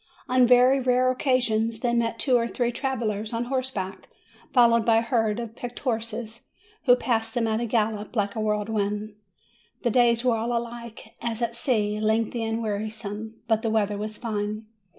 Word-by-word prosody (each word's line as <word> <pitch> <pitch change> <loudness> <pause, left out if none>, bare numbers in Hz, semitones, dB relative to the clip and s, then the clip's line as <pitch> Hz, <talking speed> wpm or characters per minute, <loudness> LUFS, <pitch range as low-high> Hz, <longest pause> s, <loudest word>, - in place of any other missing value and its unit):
On 255 -1 +4
very 250 +2 +6
rare 255 0 +3
occasions 230 -4 +1
they 240 -1 +1
met 230 -1 0
two 255 0 +2
or 235 -1 +2
three 240 +1 -1
travellers 230 -5 -2
on 230 +1 -1
horseback, 250 -7 -3 0.4
followed 235 -2 +5
by 225 0 +4
a - - +4
herd 225 -2 0
of 230 -1 -6
picked 245 0 -7
horses, 230 -2 -4 0.4
who 245 -2 +7
passed 225 -2 -1
them 240 -2 +1
at 220 0 0
a 240 - -2
gallop, 215 -1 -1
like 205 0 0
a - - -2
whirlwind. 210 0 -1 0.7
The 240 - +2
days 235 0 +3
were 245 -2 +4
all 235 +2 -1
alike, 235 -1 -7
as 235 0 -2
at 235 0 -2
sea, 215 -4 0
lengthy 225 +2 0
and 225 +1 -2
wearisome; 215 +1 -5
but 220 -1 +2
the 225 - -1
weather 210 -2 0
was 215 0 -5
fine. 215 -2 -3
230 Hz, 175 wpm, -25 LUFS, 215-240 Hz, 0.7 s, who